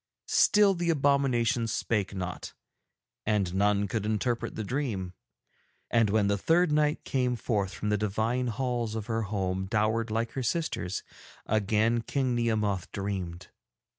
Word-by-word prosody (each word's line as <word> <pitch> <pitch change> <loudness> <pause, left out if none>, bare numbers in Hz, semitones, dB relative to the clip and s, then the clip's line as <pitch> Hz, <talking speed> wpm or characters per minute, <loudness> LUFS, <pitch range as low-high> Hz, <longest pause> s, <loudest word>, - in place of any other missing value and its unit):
'Still 205 -1 +5
the 175 -1 -1
abominations 135 -6 +2
spake 105 -5 -1
not, 90 -1 -5 0.7
and 100 -4 0
none 100 +1 +2
could 105 +2 -2
interpret 115 +2 -1
the 110 - -3
dream. 105 -7 -2 0.8
And 115 -3 +3
when 105 0 +2
the 100 0 +1
third 170 - +3
night 150 0 +2
came 125 -2 0
forth 105 -4 -1
from 105 - -3
the 105 -1 +1
divine 110 +4 0
halls 120 -1 -2
of 110 -2 -3
her 115 0 -1
home 95 -3 -2
dowered 110 +2 +1
like 115 +1 -1
her 135 - -3
sisters, 120 - -2 0.4
again 110 +2 +2
King 130 +2 -1
Nehemoth 105 -5 0
dreamed. 95 -4 -4
110 Hz, 140 wpm, -28 LUFS, 100-125 Hz, 0.8 s, Still